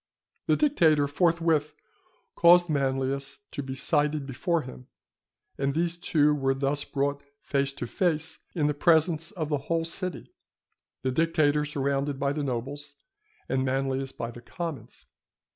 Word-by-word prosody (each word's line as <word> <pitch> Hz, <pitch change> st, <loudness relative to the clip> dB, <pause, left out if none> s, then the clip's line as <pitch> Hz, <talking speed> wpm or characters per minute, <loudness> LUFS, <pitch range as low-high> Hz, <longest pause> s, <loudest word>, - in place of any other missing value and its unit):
The -, -, +4 dB
dictator, 160 Hz, -, +3 dB
forthwith, 165 Hz, -1 st, +1 dB, 0.6 s
caused 175 Hz, 0 st, +6 dB
Manlius 135 Hz, 0 st, -1 dB
to 145 Hz, -, -4 dB
be 130 Hz, -1 st, -5 dB
cited 145 Hz, +2 st, +1 dB
before 160 Hz, +5 st, -1 dB
him; 130 Hz, 0 st, -11 dB, 0.7 s
and 140 Hz, 0 st, 0 dB
these 170 Hz, +1 st, +1 dB
two 150 Hz, -3 st, +2 dB
were 135 Hz, -2 st, +1 dB
thus 140 Hz, +1 st, -1 dB
brought 140 Hz, 0 st, -1 dB, 0.2 s
face 140 Hz, -1 st, 0 dB
to 140 Hz, -, -5 dB
face 160 Hz, -3 st, -1 dB, 0.2 s
in 155 Hz, -4 st, +1 dB
the 150 Hz, -, +2 dB
presence 160 Hz, +1 st, +3 dB
of 165 Hz, -8 st, -4 dB
the 145 Hz, -2 st, 0 dB
whole 165 Hz, -1 st, +1 dB
city, 180 Hz, +2 st, -5 dB, 0.7 s
the 130 Hz, -, +1 dB
dictator 150 Hz, 0 st, +2 dB
surrounded 140 Hz, -1 st, -1 dB
by 140 Hz, 0 st, +1 dB
the 150 Hz, -, -2 dB
nobles, 140 Hz, +3 st, -4 dB, 0.5 s
and 130 Hz, 0 st, 0 dB
Manlius 135 Hz, 0 st, -1 dB
by 115 Hz, -2 st, -5 dB
the 120 Hz, -, -11 dB
commons. 145 Hz, -4 st, -7 dB
145 Hz, 145 wpm, -27 LUFS, 135-165 Hz, 0.7 s, caused